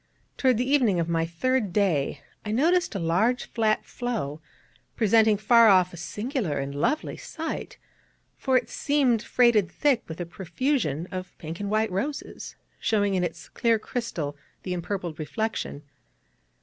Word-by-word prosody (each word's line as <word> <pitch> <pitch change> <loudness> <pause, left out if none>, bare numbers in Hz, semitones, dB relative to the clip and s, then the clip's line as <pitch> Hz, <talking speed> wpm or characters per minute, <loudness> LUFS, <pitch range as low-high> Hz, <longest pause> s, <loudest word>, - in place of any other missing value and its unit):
Toward 255 -4 +3
the 250 +2 0
evening 250 -10 +3
of 165 - 0
my 165 -1 0
third 215 +5 0
day 160 -8 +1 0.2
out 210 - -6
I - - -1
noticed 330 - +2
a - - -1
large 185 +9 +1
flat 220 -2 +1
floe, 210 - -4 0.5
presenting 220 -1 +4
far 230 +2 +6
off 185 -3 +5
a - - -8
singular 205 - -3
and 140 0 -3
lovely 300 - -1
sight, 325 0 -6 0.6
for 260 -1 +2
it - - -1
seemed 270 -6 +1
freighted 235 -6 +3
thick 275 -6 +2
with 160 +1 -7
a 175 - -2
profusion 175 - -1
of 185 -1 -6
pink 165 +1 -7
and 200 -1 -3
white 215 0 +1
roses, 275 +11 -4 0.2
showing 205 -3 +1
in 185 -1 +1
its 175 - -4
clear 230 -1 +2
crystal 215 - -4 0.3
the 180 - -3
empurpled 175 -2 -4
reflection. 160 -2 -3
210 Hz, 155 wpm, -26 LUFS, 170-245 Hz, 0.6 s, far